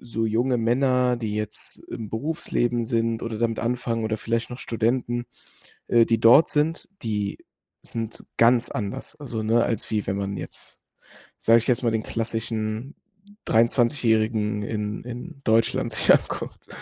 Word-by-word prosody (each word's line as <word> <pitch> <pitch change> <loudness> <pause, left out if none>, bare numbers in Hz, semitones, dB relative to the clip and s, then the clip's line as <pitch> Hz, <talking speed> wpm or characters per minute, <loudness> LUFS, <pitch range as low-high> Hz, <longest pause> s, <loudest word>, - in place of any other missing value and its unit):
so 115 -2 -2
junge 120 +4 +1
Männer, 125 +1 +2
die 110 -3 -3
jetzt 105 0 -4
im 110 -3 -6
Berufsleben 120 -2 -1
sind 115 -1 0
oder 115 -2 -4
damit 115 0 0
anfangen 115 -1 -1
oder 110 0 -1
vielleicht 115 +2 -2
noch 120 - -7
Studenten, 120 +1 -1 0.6
äh, 115 -1 +5
die 115 -1 +1
dort 120 +8 +7
sind, 155 +2 0
die 105 -3 -2 0.4
sind 115 -1 -5
ganz 120 +1 +4
anders. 105 -3 -4
Also, 120 -7 -4
ne, 115 +2 +3
als 115 - -2
wie 105 -2 -1
wenn 95 - -1
man 100 0 -3
jetzt, - - -8 0.6
sage 115 +1 +5
ich 115 - -4
jetzt 125 -1 +2
mal, 115 - +2
den 110 -1 -1
klassischen 115 +2 -3 0.5
23- 120 +4 +2
Jährigen 110 -2 +1
in 105 0 -3
in 125 +3 -8
Deutschland 115 -1 +2
sich - - +4
anguckt. - - 0
115 Hz, 155 wpm, -24 LUFS, 110-120 Hz, 0.6 s, dort